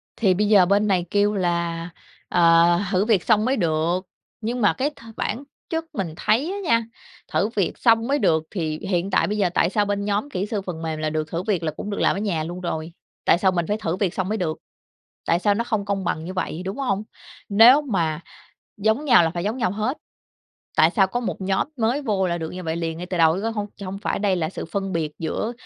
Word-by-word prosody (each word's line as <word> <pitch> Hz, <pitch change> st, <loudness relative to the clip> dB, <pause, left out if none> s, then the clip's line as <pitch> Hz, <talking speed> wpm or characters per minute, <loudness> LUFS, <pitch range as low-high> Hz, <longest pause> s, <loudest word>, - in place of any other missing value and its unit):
Thì 195 Hz, -5 st, +3 dB
bây 205 Hz, +3 st, +1 dB
giờ 200 Hz, -4 st, +6 dB
bên 200 Hz, +3 st, +2 dB
này 180 Hz, -3 st, +1 dB
kêu 205 Hz, +1 st, +2 dB
là, 170 Hz, -2 st, -1 dB, 0.4 s
ờ, 170 Hz, 0 st, +5 dB
thử 190 Hz, +2 st, +2 dB
việc 210 Hz, -6 st, +2 dB
xong 215 Hz, -1 st, +3 dB
mới 265 Hz, +2 st, +1 dB
được, 170 Hz, +1 st, 0 dB, 0.3 s
nhưng 240 Hz, +2 st, -2 dB
mà 205 Hz, -, +4 dB
cái 275 Hz, +3 st, -1 dB
th 295 Hz, -, -19 dB, 0.2 s
bản 235 Hz, +7 st, -2 dB, 0.3 s
chất 325 Hz, 0 st, -2 dB
mình 180 Hz, -7 st, -3 dB
thấy 260 Hz, -, +1 dB
á 400 Hz, -, -4 dB
nha, 230 Hz, 0 st, +4 dB, 0.5 s
thử 210 Hz, -, +2 dB
việc 190 Hz, -5 st, 0 dB
xong 230 Hz, 0 st, +3 dB
mới 285 Hz, +1 st, +1 dB
được 160 Hz, -1 st, +2 dB
thì 155 Hz, -5 st, -3 dB
hiện 190 Hz, 0 st, -1 dB
tại -, -, +3 dB
bây 210 Hz, +1 st, -2 dB
giờ 190 Hz, -4 st, +2 dB
tại -, -, +3 dB
sao 205 Hz, +1 st, +1 dB
bên 200 Hz, 0 st, -2 dB
nhóm 210 Hz, +7 st, -1 dB
kỹ 195 Hz, -7 st, -2 dB
sư 210 Hz, -2 st, -3 dB
phần 175 Hz, -4 st, -6 dB
mềm 160 Hz, -1 st, -3 dB
là 155 Hz, 0 st, -1 dB
được 155 Hz, 0 st, -2 dB
thử 170 Hz, +2 st, -2 dB
việc 190 Hz, -6 st, -1 dB
là 155 Hz, -, 0 dB
cũng 205 Hz, -, -7 dB
được 200 Hz, -, -3 dB
làm -, -, +3 dB
ở -, -, -3 dB
nhà 180 Hz, -7 st, -1 dB
luôn 175 Hz, +3 st, -6 dB
rồi, 160 Hz, -1 st, -4 dB, 0.3 s
tại 170 Hz, -, +5 dB
sao 190 Hz, 0 st, +3 dB
mình 175 Hz, -2 st, -1 dB
phải 210 Hz, -, 0 dB
thử 170 Hz, -5 st, -2 dB
việc 190 Hz, -3 st, -1 dB
xong 190 Hz, +1 st, -2 dB
mới 220 Hz, -, 0 dB
được? 160 Hz, -4 st, -2 dB, 0.7 s
Tại 170 Hz, -, +2 dB
sao 205 Hz, +1 st, +3 dB
nó 230 Hz, +3 st, -1 dB
không 215 Hz, -4 st, -2 dB
công 200 Hz, -1 st, -2 dB
bằng 160 Hz, -2 st, -2 dB
như 185 Hz, -, -5 dB
vậy, 180 Hz, -2 st, -3 dB
đúng 195 Hz, +7 st, -4 dB
hông? 210 Hz, -7 st, -1 dB, 0.5 s
Nếu 235 Hz, +8 st, +7 dB
mà 170 Hz, -, -1 dB, 0.6 s
giống 220 Hz, +8 st, +1 dB
nhau 240 Hz, -, +6 dB
là 165 Hz, -, +2 dB
phải 175 Hz, +1 st, -4 dB
giống 220 Hz, +5 st, -2 dB
nhau 185 Hz, -7 st, 0 dB
hết, 220 Hz, +7 st, -2 dB, 0.8 s
tại -, -, +5 dB
sao 195 Hz, -4 st, +3 dB
có 245 Hz, +6 st, -3 dB
một 230 Hz, -, -4 dB
nhóm 190 Hz, +7 st, 0 dB
mới 240 Hz, +5 st, 0 dB
vô 195 Hz, -6 st, 0 dB
là 170 Hz, -1 st, -1 dB
được 160 Hz, -1 st, -4 dB
như 185 Hz, 0 st, -7 dB
vậy 160 Hz, 0 st, -2 dB
liền 165 Hz, -1 st, -3 dB
ngay 180 Hz, -, -6 dB
từ 180 Hz, -1 st, -3 dB
đầu 160 Hz, 0 st, +5 dB
chứ 195 Hz, -, -4 dB
có 225 Hz, -, 0 dB
hông 210 Hz, -2 st, -3 dB
cho 200 Hz, -, -8 dB
hông 195 Hz, +1 st, -5 dB
phải 205 Hz, -, -2 dB
đây 195 Hz, -2 st, +1 dB
là 160 Hz, -2 st, -1 dB
sự -, -, -6 dB
phân 195 Hz, +3 st, -3 dB
biệt 155 Hz, -2 st, -2 dB
giữa 215 Hz, +8 st, -2 dB
195 Hz, 255 wpm, -23 LUFS, 170-215 Hz, 0.8 s, Nếu